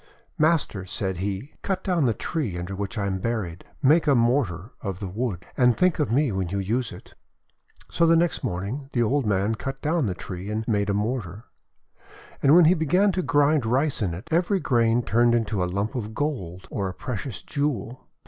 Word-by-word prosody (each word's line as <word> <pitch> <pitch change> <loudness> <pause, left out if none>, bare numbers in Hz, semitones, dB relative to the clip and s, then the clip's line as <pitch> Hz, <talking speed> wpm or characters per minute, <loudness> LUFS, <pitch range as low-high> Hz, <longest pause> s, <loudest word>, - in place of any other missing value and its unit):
"Master," 155 - +2
said 95 0 -3
he, 100 - -4
:<cut 195 -2 -2
down 175 -6 +1
the 115 - +3
tree 130 - -3
under 90 +3 -5
which 100 +3 -4
I 100 - 0
am 95 -1 -1
buried. 95 -6 -3 0.2
Make 155 +4 +5
a 140 - +5
mortar 115 -5 +1
of 95 -2 -4
the 100 - -4
wood, 95 -2 -3
and 125 -2 +4
think 180 -3 +2
of 145 -6 0
me 135 +1 +2
when 95 -2 -2
you 100 - -2
use 110 +6 -1
it." - - -12 0.8
So 170 - +3
the 165 - +6
next 170 -2 +1
morning, 115 +6 -3
the 120 - +2
old 130 +2 +1
man 100 +2 +1
cut 135 +4 -5
down 155 -3 0
the 95 - -2
tree 95 +3 -7
and 110 +1 -3
made 105 -3 +1
a 100 - +1
mortar. 105 -1 -3 1.0
And 140 +2 +6
when 175 -1 +8
he 165 - +6
began 180 +5 +3
to 185 - -1
grind 145 -3 +3
Rice 130 +5 0
in 90 -5 -1
it, 90 - -10
every 180 +4 +2
grain 120 -4 +2
turned 120 +1 +3
into 105 -5 0
a 90 - -1
lump 100 +6 -2
of 110 -4 -5
gold 95 - -3
or 100 -2 -2
a 90 - -8
precious 125 +3 -5
jewel. 130 -5 -3
115 Hz, 205 wpm, -25 LUFS, 100-145 Hz, 1.0 s, when